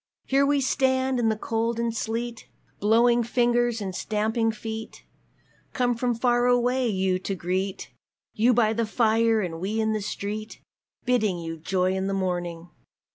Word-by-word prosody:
Here 275 Hz, +1 st, +3 dB
we 285 Hz, -1 st, +2 dB
stand 260 Hz, -1 st, +1 dB
in 225 Hz, -2 st, +2 dB
the 220 Hz, -, +1 dB
cold 230 Hz, +1 st, -1 dB
and 235 Hz, 0 st, 0 dB
the -, -, -10 dB
sleet, 230 Hz, +1 st, -4 dB, 0.3 s
Blowing 235 Hz, +3 st, +4 dB
fingers 240 Hz, 0 st, +1 dB
and 190 Hz, -2 st, -4 dB
stamping 220 Hz, +3 st, 0 dB
feet, 220 Hz, 0 st, -7 dB, 0.7 s
Come 245 Hz, -2 st, +1 dB
from 240 Hz, 0 st, -1 dB
far 240 Hz, +1 st, +2 dB
away 245 Hz, +1 st, +2 dB
you 190 Hz, -2 st, 0 dB
to 195 Hz, +1 st, -3 dB
greet 185 Hz, +2 st, -3 dB, 0.4 s
You 230 Hz, +4 st, +3 dB
by 225 Hz, -2 st, +3 dB
the 230 Hz, 0 st, -1 dB
fire 225 Hz, 0 st, +2 dB
and 165 Hz, -4 st, -4 dB
we 205 Hz, +5 st, -2 dB
in 220 Hz, 0 st, +1 dB
the 215 Hz, -, -2 dB
street 210 Hz, +2 st, -5 dB, 0.5 s
Bidding 220 Hz, -7 st, +1 dB
you 165 Hz, -1 st, -5 dB
joy 185 Hz, +3 st, 0 dB
in 190 Hz, 0 st, -1 dB
the 195 Hz, -, -1 dB
morning! 175 Hz, -2 st, -3 dB
225 Hz, 165 wpm, -25 LUFS, 195-240 Hz, 0.7 s, Blowing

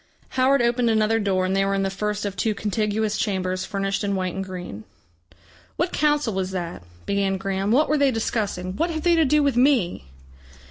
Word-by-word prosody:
Howard 260 Hz, 0 st, +3 dB
opened 240 Hz, 0 st, +2 dB
another 220 Hz, 0 st, +2 dB
door, 190 Hz, -3 st, +1 dB
and 190 Hz, +1 st, 0 dB
they 195 Hz, -, +3 dB
were 195 Hz, 0 st, 0 dB
in 195 Hz, -, 0 dB
the 195 Hz, -, -1 dB
first 210 Hz, +1 st, -2 dB
of 200 Hz, -1 st, -3 dB
two 215 Hz, +2 st, 0 dB
contiguous 210 Hz, +1 st, -1 dB
chambers 185 Hz, -2 st, -1 dB
furnished 195 Hz, -1 st, -2 dB
in 200 Hz, -1 st, 0 dB
white 185 Hz, -2 st, -2 dB
and 195 Hz, -, -3 dB
green. 180 Hz, -, -7 dB, 0.9 s
"What 340 Hz, +2 st, -1 dB
Council 295 Hz, -6 st, +1 dB
was 190 Hz, -1 st, -2 dB
that?" 175 Hz, -, -5 dB, 0.2 s
began 200 Hz, -1 st, 0 dB
Graham. 195 Hz, +1 st, -2 dB
"What 285 Hz, +6 st, +4 dB
were 300 Hz, 0 st, +1 dB
they 280 Hz, -1 st, +4 dB
discussing? 205 Hz, -6 st, -2 dB
What 335 Hz, +2 st, +1 dB
have 315 Hz, -2 st, -3 dB
they 345 Hz, -, +4 dB
to 325 Hz, -2 st, +4 dB
do 300 Hz, +2 st, +3 dB
with 280 Hz, -3 st, +1 dB
me?" 245 Hz, -, +2 dB
205 Hz, 200 wpm, -23 LUFS, 190-245 Hz, 0.9 s, What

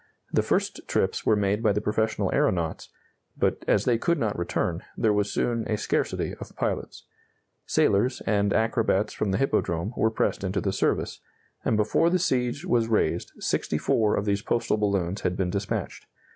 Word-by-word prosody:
The -, -, +4 dB
first -, -, -1 dB
trips -, -, 0 dB
were 110 Hz, -, +5 dB
made 105 Hz, +1 st, +1 dB
by 110 Hz, -3 st, +3 dB
the 105 Hz, -, 0 dB
professional 105 Hz, -1 st, 0 dB
aeronauts, 90 Hz, -, 0 dB, 0.5 s
but, -, -, 0 dB
as -, -, +3 dB
they 120 Hz, -2 st, +2 dB
could 170 Hz, +6 st, +1 dB
not 110 Hz, -7 st, -1 dB
return, 85 Hz, -, -1 dB, 0.2 s
there 110 Hz, -2 st, +3 dB
was 105 Hz, 0 st, 0 dB
soon 115 Hz, -2 st, 0 dB
a 105 Hz, -, 0 dB
scarcity -, -, -1 dB
of -, -, -9 dB
pilots. -, -, -3 dB, 0.6 s
Sailors, 105 Hz, +6 st, +2 dB
and 100 Hz, -2 st, +2 dB
acrobats 110 Hz, -2 st, +1 dB
from 105 Hz, -, -1 dB
the 95 Hz, -, +1 dB
Hippodrome, 100 Hz, -7 st, 0 dB
were 110 Hz, -, +2 dB
pressed 110 Hz, -, -1 dB
into 95 Hz, +1 st, -1 dB
the 95 Hz, -1 st, -1 dB
service, -, -, 0 dB, 0.4 s
and 110 Hz, -, +1 dB
before 110 Hz, +10 st, +3 dB
the 185 Hz, -, +2 dB
siege 130 Hz, -5 st, 0 dB
was 115 Hz, -2 st, +2 dB
raised 110 Hz, -2 st, 0 dB
64 105 Hz, -2 st, +1 dB
of 100 Hz, -, -1 dB
these 100 Hz, 0 st, 0 dB
postal 115 Hz, -1 st, 0 dB
balloons 100 Hz, -2 st, 0 dB
had 90 Hz, -, -1 dB
been 90 Hz, -2 st, 0 dB
dispatched. 100 Hz, +1 st, -3 dB
105 Hz, 170 wpm, -26 LUFS, 100-115 Hz, 0.6 s, were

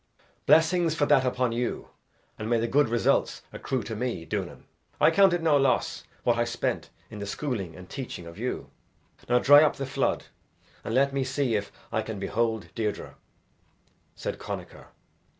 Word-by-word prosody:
"Blessings 165 Hz, 0 st, +4 dB
for 145 Hz, -, +2 dB
that 135 Hz, -, +4 dB
upon 125 Hz, -1 st, 0 dB
you 120 Hz, +1 st, -3 dB, 0.5 s
and 110 Hz, +1 st, -4 dB
may 120 Hz, -1 st, +3 dB
the 115 Hz, -, 0 dB
good 145 Hz, 0 st, +3 dB
results 120 Hz, 0 st, +1 dB
accrue 130 Hz, -3 st, -2 dB
to 110 Hz, -, -5 dB
me, 115 Hz, -7 st, -3 dB
Duanan. -, -, -4 dB, 0.4 s
I -, -, +6 dB
count 195 Hz, +2 st, +5 dB
it 175 Hz, -1 st, -1 dB
no 155 Hz, -3 st, +4 dB
loss 135 Hz, -2 st, +1 dB, 0.2 s
what 120 Hz, -1 st, +2 dB
I -, -, +4 dB
spent 120 Hz, 0 st, -2 dB, 0.2 s
in 105 Hz, -, -8 dB
the 100 Hz, -, -5 dB
schooling 100 Hz, -, -3 dB
and 90 Hz, 0 st, -11 dB
teaching 125 Hz, -9 st, -6 dB
of 85 Hz, 0 st, -11 dB
you. -, -, -4 dB, 0.6 s
Now 125 Hz, -, +5 dB
dry 145 Hz, +4 st, +8 dB
up 155 Hz, -, +3 dB
the 135 Hz, -, -4 dB
flood 135 Hz, 0 st, -1 dB, 0.6 s
and 115 Hz, -, -3 dB
let 140 Hz, +1 st, +3 dB
me 135 Hz, -1 st, 0 dB
see 130 Hz, -2 st, -1 dB
if 105 Hz, -1 st, -1 dB, 0.2 s
I 110 Hz, -1 st, 0 dB
can 110 Hz, -1 st, -6 dB
behold 110 Hz, -1 st, -1 dB
Deirdre," 105 Hz, -2 st, -3 dB, 1.0 s
said -, -, -5 dB
Connachar. -, -, -7 dB
125 Hz, 175 wpm, -27 LUFS, 110-140 Hz, 1.0 s, dry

